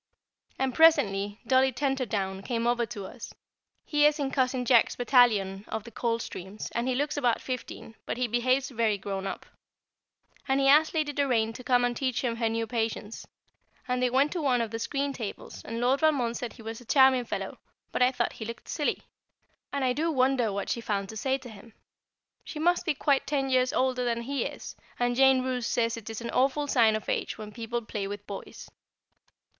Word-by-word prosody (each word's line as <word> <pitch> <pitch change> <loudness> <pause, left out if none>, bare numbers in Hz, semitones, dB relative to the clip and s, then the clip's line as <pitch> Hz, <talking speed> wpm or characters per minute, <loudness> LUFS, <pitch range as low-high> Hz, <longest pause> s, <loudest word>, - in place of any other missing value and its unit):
And 265 -1 0
presently 205 -11 +3
Dolly 260 +2 +4
Tenterdown 235 -8 -2
came 230 +2 -2
over 240 -1 +1
to 205 -5 -7
us 230 +4 -9 0.5
(he 295 -1 +4
is 300 0 +1
in 275 -3 -2
Cousin 255 -2 0
Jack's 235 -1 +4
battalion 220 -6 +3
of 220 - -4
the 235 - -11
Coldstreams, 215 -4 -4
and 235 +2 -2
he 255 - +1
looks 290 +3 -1
about 245 -5 +2
fifteen, 250 -3 -6
but - - -2
he 250 0 0
behaves 255 +3 +1
very 225 -4 +1
"grown 195 0 -4
up"), 195 - -6 1.0
and 270 +1 +2
he 270 - +3
asked 305 +4 +5
Lady 305 -2 0
Doraine 245 -6 +1
to 250 - -10
come 245 0 +3
and 245 0 -1
teach 255 -1 -1
him 235 -2 -1
her 230 -1 +1
new 225 0 -1
"Patience"; 225 -1 -3 0.6
and 250 0 0
they 250 - +3
went 270 +4 +2
to 350 - -2
one 260 -4 +2
of 230 -2 -2
the 225 - -4
screen 275 +4 -2
tables, 220 -6 -7
and 230 +1 -4
Lord 255 +3 +2
Valmond 275 -7 +2
said 240 -2 -5
he 225 - -13
was 225 +2 -6
a - - -15
charming 265 0 +5
fellow, - - -5 0.3
but - - -2
I 250 +1 +5
thought 260 - -1
he 220 - -7
looked 230 +1 -8
silly, 295 - -1 0.7
and 280 -2 -1
I 250 - +2
do 320 +5 0
wonder 255 -5 +2
what 200 0 -3
she 235 - -2
found 200 -3 -2
to 220 - -8
say 265 +5 0
to 260 -2 -12
him. 220 0 -13 0.7
She - - -8
must 350 +3 +1
be 315 - +2
quite 280 -1 +1
ten 270 -2 0
years 255 0 +3
older 255 -1 +1
than 235 -1 -1
he 275 +3 -2
is, - - -7 0.2
and 245 0 +1
Jane 265 0 +5
Roose 250 -2 -2
says 230 0 0
it 225 -1 -8
is 225 +1 -6
an 235 - -4
awful 275 +3 +2
sign 230 -6 +4
of 215 - -5
age - - -2
when 210 -1 -8
people 235 +1 -4
play 210 -2 -4
with 205 0 -7
boys. 200 - -8
245 Hz, 205 wpm, -28 LUFS, 225-265 Hz, 1.0 s, asked